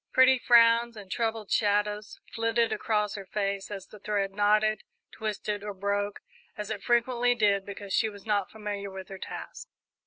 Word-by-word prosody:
Pretty 260 0 +6
frowns 235 -1 +5
and 195 -3 -10
troubled 225 -3 -2
shadows 210 0 +1
flitted 230 0 +1
across 210 -2 0
her 195 -2 -7
face 200 -1 -2
as 195 -2 -6
the 210 - -14
thread 200 -1 -1
knotted, 210 +1 +3 0.3
twisted, 210 -1 -3
or 205 -1 -5
broke, 200 +1 -2 0.4
as 210 0 -5
it 210 -2 -4
frequently 245 0 +2
did, 200 -4 +2
because 200 -1 -6
she 220 - +3
was 205 -2 -12
not 205 -3 0
familiar 205 -2 -5
with 190 -1 -9
her 195 -1 -8
task. - - -7
210 Hz, 165 wpm, -28 LUFS, 200-225 Hz, 0.4 s, Pretty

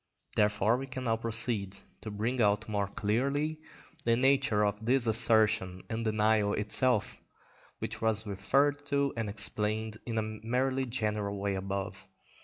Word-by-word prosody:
Therefore 105 +2 +2
we 135 +1 -5
can 130 -1 -6
now 115 -2 +1
proceed 115 -3 -2 0.2
to 110 - -6
bring 115 +5 -1
out 105 -1 +2
more 100 -2 -1
clearly 140 +10 -1 0.4
the 115 0 +3
nature 130 -5 +3
of 105 +2 -2
this 125 +2 +3
assertion 110 -5 +3
and 115 +1 -2
denial 110 -1 +2
itself, 105 +1 +1 0.6
which - - -6
was 110 -1 0
referred 140 +8 +1
to 140 -1 +1
and 115 -3 -2
explained 110 +1 -1
in 115 -1 -2
a 110 - +1 0.2
merely 130 +3 0
general 105 -4 -2
way 100 0 -1
above. 95 +1 -4
110 Hz, 145 wpm, -30 LUFS, 105-125 Hz, 0.6 s, the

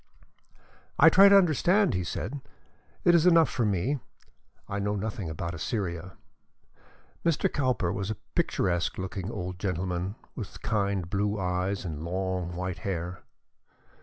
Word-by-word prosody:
"I 160 - +8
try 195 +4 +8
to 200 - +8
understand 180 +3 +4
London," 90 - -1
he - - -2
said. 110 - -4 0.6
"It 175 - +5
is 170 0 +5
enough 165 -2 +5
for 120 -4 0
me. 105 +9 0 0.7
I 100 - -3
know 105 +1 -1
nothing 105 -3 -3
about 85 +2 -4
Assyria." 90 0 -3 1.1
Mr. 165 -3 +1
Cowper 125 -10 0
was 100 0 -3
a 110 - -2 0.2
picturesque 90 -2 0
looking 95 0 -4
old 90 -4 -5
gentleman, 90 0 -2 0.2
with 105 -6 -7
kind 100 -4 0
blue 105 +2 -1
eyes 95 +2 -1
and 80 -3 -5
long 90 0 -2
white 90 0 -3
hair. 90 -1 -4
95 Hz, 140 wpm, -28 LUFS, 90-115 Hz, 1.1 s, I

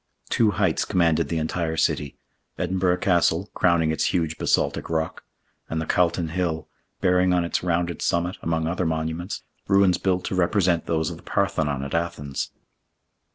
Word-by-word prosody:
Two 115 -2 +4
heights - - +2
commanded 85 -4 +2
the 85 - -1
entire 80 +1 -2
city; 75 -3 0 0.4
Edinburgh 90 0 +1
Castle, 90 +1 +2
crowning 85 -3 +3
its 80 - 0
huge 80 -2 0
basaltic - - +1
rock, 80 -1 -2 0.5
and 80 - -2
the 80 - -2
Calton 85 -1 +1
Hill, 80 -2 -2 0.3
bearing 90 0 +3
on 90 -1 +2
its 85 - -1
rounded 85 -1 -1
summit, 85 +2 0
among 80 -1 -1
other 90 +1 -1
monuments, 80 +3 -3 0.2
ruins 95 -2 +4
built 90 -2 0
to - - -3
represent 90 -2 +2
those 80 0 0
of 85 - -7
the - - -15
Parthenon 75 -8 0
at 70 - -6
Athens. 75 -5 -2
85 Hz, 155 wpm, -24 LUFS, 80-90 Hz, 0.5 s, Two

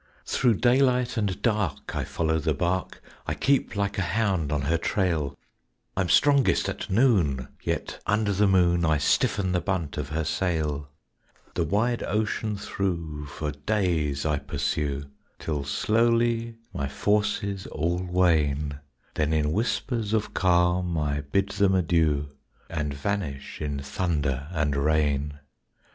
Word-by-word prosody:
Thro' 120 - +2
daylight 125 +2 +3
and 105 -5 -1
dark 105 - -1
I - - -1
follow 80 -1 0
the 80 -1 0
bark, 90 +4 -2 0.2
I - - -1
keep 140 -4 +1
like 100 0 -1
a 90 -2 -1
hound 95 -9 +1
on 75 -2 0
her 80 +3 +1
trail; 80 -8 0 0.6
I'm 95 -2 0
strongest 140 -3 +4
at - - -4
noon, 95 - +2
yet - - -3
under 105 -1 +2
the 100 +2 +3
moon 90 -2 +3
I 80 -2 +3
stiffen 95 +5 +1
the 90 -1 +1
bunt 90 -7 -2
of 70 - -4
her 80 +1 -1
sail; 75 -4 -1 0.6
The 85 - 0
wide 110 +8 +1
ocean 105 0 -1
thro' 85 -7 -3
for 75 +2 -4
days 75 -3 0
I 75 -2 +1
pursue, 70 0 -2 0.3
Till 75 -3 -3
slowly 115 +9 +1 0.2
my 70 - -2
forces 100 +3 0
all 85 +3 -1
wane; 75 -6 +1 0.3
Then 75 0 0
in 75 -1 +1
whispers 115 - -1
of 110 -2 0
calm 90 -1 +2
I 75 -1 0
bid 95 +8 0
them 100 -1 +2
adieu 80 -5 +2 0.4
And 75 -3 -2
vanish 70 -3 -4
in 75 -2 -2
thunder 70 -3 -1
and 75 -4 0
rain. 75 -1 +1
85 Hz, 140 wpm, -26 LUFS, 75-100 Hz, 0.6 s, strongest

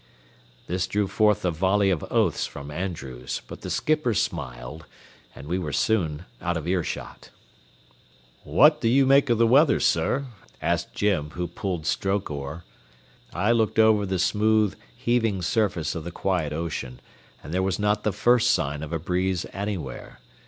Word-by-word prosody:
This 90 +1 -1
drew 105 0 0
forth 105 -1 +2
a 90 - +2
volley 95 +4 +2
of 85 -5 -1
oaths - - +1
from 70 0 -9
Andrews, 70 -8 -5
but - - -10
the - - -6
skipper 155 -7 +1
smiled, - - -4 0.5
and - - -10
we 90 +3 -1
were 80 -5 -4
soon 85 -5 0 0.2
out 85 -1 -1
of 80 0 -5
earshot. 90 -2 -3 1.1
"What 150 - +5
do 115 - +2
you 135 +3 +4
make 140 0 +4
of 120 - +3
the 115 - +4
weather, 135 +6 +5
sir?" 140 +2 +1 0.3
asked - - -1
Jim, 90 -8 +1
who 90 0 -2
pulled 85 -1 -4
stroke 95 +1 -1
oar. 70 +3 -6 0.7
I 100 +6 +1
looked 110 -2 +1
over 110 -2 +4
the 95 0 -1
smooth, 105 +2 +2 0.2
heaving 115 -6 0
surface 90 -5 0
of 85 - -5
the 85 - -6
quiet 90 -4 -1
ocean, 75 -6 -4 0.4
and 75 - -7
there 95 - +1
was 95 -1 0
not 105 0 +1
the 105 - +1
first 120 +4 +3
sign 75 - 0
of 80 - -6
a 85 - 0
breeze 90 +2 -1
anywhere. 95 -10 -5
95 Hz, 165 wpm, -25 LUFS, 80-110 Hz, 1.1 s, What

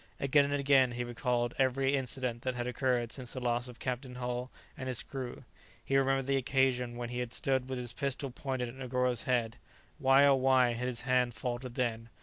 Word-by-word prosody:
Again 140 +1 +4
and 145 0 0
again 135 -3 +4
he 120 0 -2
recalled 120 0 -1
every 135 +1 +2
incident 125 -2 -2
that 130 0 -2
had 120 0 -2
occurred 125 -2 0
since 125 -3 -6
the 130 - -4
loss 120 0 0
of 125 -1 -10
Captain 125 0 -4
Hull 125 0 -3 0.3
and 130 0 -5
his 125 - +1
crew; 130 -3 -6 0.4
he 135 - 0
remembered 135 0 +3
the 135 0 +2
occasion 125 -2 +1
when 120 -1 -4
he 120 0 -4
had 125 -1 -3
stood 130 -1 0
with 130 - -2
his 120 -2 -4
pistol 140 -1 -2
pointed 130 -1 -3
at 120 - -8
Negoro's 125 -1 -1
head; 120 -2 0 0.4
why, 135 +1 +6
oh 140 - +6
why, 130 -2 +4
had 125 +2 -3
his 120 -2 -3
hand 125 -1 +1
faltered 120 +2 -4
then? 115 -2 -1
125 Hz, 205 wpm, -32 LUFS, 120-135 Hz, 0.4 s, why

